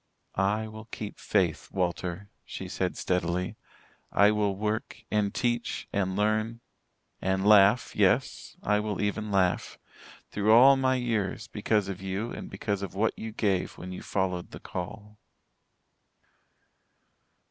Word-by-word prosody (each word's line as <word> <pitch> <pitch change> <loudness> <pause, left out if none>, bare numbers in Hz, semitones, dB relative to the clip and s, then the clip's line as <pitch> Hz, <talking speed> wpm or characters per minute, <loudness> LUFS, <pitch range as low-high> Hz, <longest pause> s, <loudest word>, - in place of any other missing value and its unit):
"I 105 +3 +1
will 110 0 -9
keep 105 -2 -7
faith, 90 -6 0
Walter," 90 +1 -2
she - - -7
said - - -2
steadily. 90 0 -1 0.6
"I 100 +1 +5
will 105 -2 +1
work 110 +2 -3
and 105 -1 +1
teach 120 +1 -1
and 95 -2 0
learn 110 +3 0 0.6
and 95 +1 0
laugh, 105 +3 +6
yes, - - +1
I 105 0 +2
will 105 -1 -3
even 105 +1 -1
laugh 95 -2 +1 0.5
through 105 +1 +3
all 130 +4 +8
my 130 -1 +2
years, 115 -4 -1
because 105 -1 0
of 95 -1 -5
you 95 +4 -3
and - - -7
because 100 -2 -2
of 95 -2 -5
what 110 +3 +1
you 110 - -6
gave 100 -4 0
when 90 - -7
you 90 - -6
followed 95 -2 -2
the - - -9
call." 105 +4 -7
105 Hz, 135 wpm, -28 LUFS, 95-110 Hz, 0.6 s, all